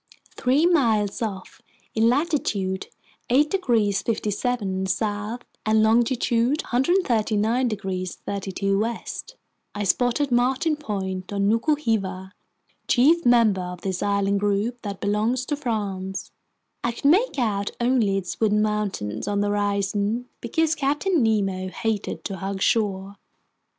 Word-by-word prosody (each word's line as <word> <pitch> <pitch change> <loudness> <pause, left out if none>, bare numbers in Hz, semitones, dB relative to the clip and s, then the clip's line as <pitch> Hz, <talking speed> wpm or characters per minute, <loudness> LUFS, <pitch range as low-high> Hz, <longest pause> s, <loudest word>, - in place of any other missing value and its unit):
Three 270 +6 +2
miles 230 - +2
off, 195 -4 -5 0.3
in 225 +1 +3
latitude 240 - 0 0.4
8 290 +5 +3
degrees 230 - +1
57' 210 -3 -1
south 210 +4 -2 0.2
and 215 0 +3
longitude 240 +4 +2
139 245 - +1
degrees 190 -4 -3
32' 195 0 -1
west, 230 +2 -4 0.4
I 205 - -2
spotted 245 +7 +1
Martin 260 +6 +2
Point 190 -9 -4
on 200 0 0
Nuku 230 +8 +2
Hiva, 190 -7 -2 0.6
chief 315 +7 +4
member 230 -6 +4
of 180 -1 -6
this 190 -2 -3
island 200 0 +1
group 205 +4 -1
that 200 -2 -6
belongs 220 +5 0
to 295 - -1
France. 200 -8 -3 0.5
I 235 - 0
could 235 - -10
make 370 - +4
out 205 -5 0
only 235 -5 +2
its 180 -2 -5
wooded 210 -1 +3
mountains 210 - -2
on 205 0 0
the 205 - +1
horizon, 205 +3 0
because 315 +7 +1
Captain 300 +4 +1
Nemo 195 -4 +1
hated 220 +1 -3
to 195 - -4
hug 195 +1 -4
shore. 200 -2 0
215 Hz, 125 wpm, -24 LUFS, 200-245 Hz, 0.6 s, chief